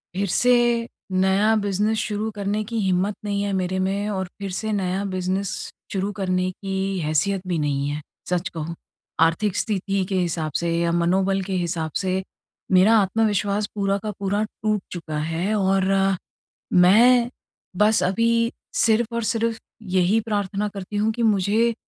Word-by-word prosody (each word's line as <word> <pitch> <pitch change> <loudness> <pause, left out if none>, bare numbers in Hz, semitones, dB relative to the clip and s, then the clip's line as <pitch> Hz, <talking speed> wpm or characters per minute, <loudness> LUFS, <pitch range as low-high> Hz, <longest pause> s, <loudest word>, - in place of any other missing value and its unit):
फिर 200 +1 0
से 250 +7 +4 0.6
नया 190 +4 +3
बिज़नेस 205 +2 0
शुरू 215 +1 -2
करने 205 +1 -1
की 230 +1 -4
हिम्मत 190 +1 +1
नहीं 200 -1 -1
है 205 - -1
मेरे 185 0 -1
में। 200 +2 -1
और 190 -2 -2
फिर 200 -1 -4
से 220 0 -2
नया 195 -1 -1
बिज़नेस 185 +1 -2 0.4
शुरू 195 +1 -1
करने 185 -1 0
की 195 +1 -6 0.2
हैसियत 160 +5 0
भी 175 -2 0
नहीं 140 -1 -1
है, 150 +1 -4 0.3
सच 180 0 0
कहूँ। 165 0 -5 0.5
आर्थिक 175 +5 +2
स्थिति 195 -3 0
के 195 - -1
हिसाब 165 -3 -1
से 170 0 -1
या 170 0 +1
मनोबल 190 +3 +1
के 195 - -4
हिसाब 160 -2 -2
से, 190 0 0 0.5
मेरा 190 +5 +6
आत्मविश्वास 205 0 +1
पूरा 200 -1 +1
का 215 - -2
पूरा 200 +2 0
टूट 215 -1 -2
चुका 160 -3 -5
है। 165 +6 -1
और 195 -1 +2
अ, 195 0 +3 0.6
मैं 235 +7 +6 0.5
बस 210 0 +4
अभी 195 +6 +2 0.6
सिर्फ़ 230 +1 +2
और 235 - -1
सिर्फ़ 230 -1 -1 0.4
यही 185 +5 +3
प्रार्थना 205 0 -1
करती 200 +1 -6
हूँ 215 +2 +1
कि 235 - -3
मुझे 220 +2 +2
195 Hz, 160 wpm, -23 LUFS, 185-210 Hz, 0.6 s, मेरा